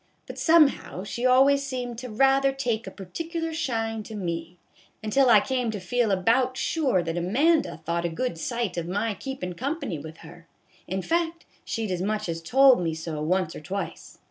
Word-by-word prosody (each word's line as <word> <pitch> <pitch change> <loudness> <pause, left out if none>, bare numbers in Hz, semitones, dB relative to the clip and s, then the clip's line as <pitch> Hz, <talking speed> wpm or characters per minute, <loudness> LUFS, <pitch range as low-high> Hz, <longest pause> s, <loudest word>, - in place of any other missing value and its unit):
But - - -8
somehow 310 - +3
she 240 +5 -1
always 270 +2 +5
seemed 250 -4 -4
to 250 0 -7
rather 270 +4 +3
take 240 -4 -2
a - - -3
particular 325 - -5
shine 225 -8 -2
to 215 +1 -9
me, 170 -2 -4 0.5
until 250 +5 +3
I 220 -3 +8
came 250 +2 -1
to 215 -2 -3
feel 230 +5 0
about 235 +7 +2
sure 265 - +1
that 165 +1 -2
Amanda 265 - +2
thought 170 +1 -1
a - - +1
good 170 +1 -3
sight 235 -2 -2
of 170 -1 -2
my 205 +4 -1
keepin' 200 -5 -5
company 265 - -3
with 160 +2 -9
her; 165 +1 -14 0.4
in 190 +1 -3
fact, 335 0 -1 0.2
she 225 -1 -3
'd 200 - -4
as 180 -1 -2
much 215 +1 -1
as 165 -1 -3
told 260 +5 +5
me 165 -2 -1
so 160 -1 -5
once 180 +1 0
or - - -7
twice. 195 +5 -6
225 Hz, 190 wpm, -26 LUFS, 180-270 Hz, 0.5 s, I